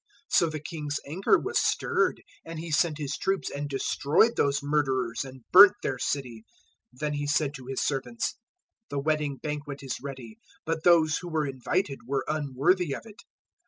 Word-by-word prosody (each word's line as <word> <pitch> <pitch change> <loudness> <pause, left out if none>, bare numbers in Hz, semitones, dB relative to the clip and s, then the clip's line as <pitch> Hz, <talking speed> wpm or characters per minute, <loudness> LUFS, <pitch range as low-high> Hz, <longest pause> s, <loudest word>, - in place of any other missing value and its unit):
022:007 - - +4
So 170 - +2
the 155 0 -5
king's 150 -2 -4
anger 170 +7 +2
was - - -1
stirred, - - +1 0.2
and 165 0 -8
he 165 +1 -6
sent 155 0 +2
his 145 -2 -3
troops 195 0 -1
and 145 0 -4
destroyed 150 - +2
those 140 0 +1
murderers 135 -5 0
and 130 -2 -11
burnt 200 +2 +10
their 130 - -2
city. 125 -5 -3 0.5
022:008 - - -20
Then 150 -1 -1
he 145 0 -2
said 145 -1 +1
to 130 -4 -10
his 135 0 -2
servants, 145 - -2 0.6
"`The 140 -1 -3
wedding 150 -2 0
banquet 145 0 -5
is 130 -2 -5
ready, 130 -5 -8 0.3
but 160 0 -2
those 160 -3 +4
who 175 - -7
were 155 -2 0
invited 135 +3 -2
were 135 0 -1
unworthy 150 +3 +1
of - - -8
it. 215 -2 -13
145 Hz, 180 wpm, -27 LUFS, 135-160 Hz, 0.6 s, burnt